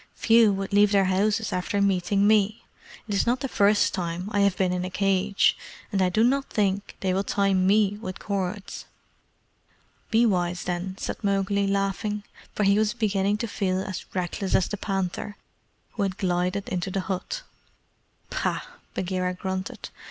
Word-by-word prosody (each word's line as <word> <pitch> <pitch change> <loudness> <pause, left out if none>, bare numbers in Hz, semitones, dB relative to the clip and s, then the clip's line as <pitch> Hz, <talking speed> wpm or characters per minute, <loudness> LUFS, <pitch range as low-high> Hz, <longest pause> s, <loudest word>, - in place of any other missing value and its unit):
Few 225 -2 +5
would 195 +1 -4
leave 205 0 +5
their 200 -2 +4
houses 205 +4 +1
after 180 +3 -1
meeting 200 0 +2
me. 215 0 +3 0.4
It 210 - -3
is 200 - +1
not 245 +2 +1
the 270 - -1
first 205 -3 +3
time 180 +1 -3
I 205 - +1
have 200 -2 +3
been 185 -1 +1
in 180 0 -1
a 185 - -3
cage; 195 +1 +2 0.4
and 195 - +1
I 185 - +3
do 215 +5 +2
not 270 +3 +2
think 200 -1 -1
they 185 -1 +1
will 195 +1 +1
tie 200 -1 +1
ME 200 +2 +3
with 185 -3 -5
cords." 200 0 -4 1.2
"Be 230 0 +4
wise, 180 -4 0
then," 180 +1 -3
said - - -5
Mowgli, 200 0 +1
laughing; 200 +1 -1 0.3
for 210 - +1
he 200 +1 +4
was 215 0 +1
beginning 205 -3 +1
to 230 - -3
feel 190 -3 -1
as 190 -1 -5
reckless 185 +1 -1
as 185 - +3
the - - -3
panther, 195 0 -3 0.5
who 220 - -5
had 195 -1 -1
glided 180 +1 -1
into 180 +1 -2
the 190 +1 -1
hut. 195 - -4 0.9
"Pah!" - - -1 0.3
Bagheera 185 0 -1
grunted. 190 +1 -5
195 Hz, 170 wpm, -25 LUFS, 185-210 Hz, 1.2 s, Few